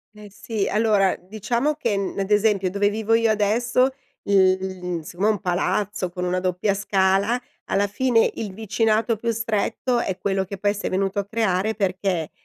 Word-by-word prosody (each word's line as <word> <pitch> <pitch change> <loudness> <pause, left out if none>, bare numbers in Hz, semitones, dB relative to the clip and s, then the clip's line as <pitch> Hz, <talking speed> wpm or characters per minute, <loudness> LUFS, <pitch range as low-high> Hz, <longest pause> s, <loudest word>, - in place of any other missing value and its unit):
Eh, 210 0 -11
sì 210 0 -3
allora, 210 -3 +2
diciamo 220 +9 -2
che 205 - -1
n 195 -1 -3
ad 195 +1 -2
esempio 205 -3 +2
dove 205 +1 +2
vivo 220 +1 -1
io 230 0 +3
adesso 235 +5 +2 0.3
l 185 -3 +1
siccome 180 +6 -2
è - - +5
un 210 - -2
palazzo 190 +1 -1
con 180 0 -5
una 180 0 0
doppia 185 +2 0
scala, 200 +3 +1 0.3
alla 200 +1 +1
fine 230 +3 +2
il 215 -3 -4
vicinato 220 +2 0
più 235 +3 -3
stretto 230 +2 -1
è 190 -5 -2
quello 195 -1 -1
che 200 +1 -7
poi 205 +1 +1
s'è 205 - -4
venuto 195 +2 0
a 200 - -2
creare 215 -1 0
perché 185 -4 -1
205 Hz, 175 wpm, -23 LUFS, 190-220 Hz, 0.3 s, è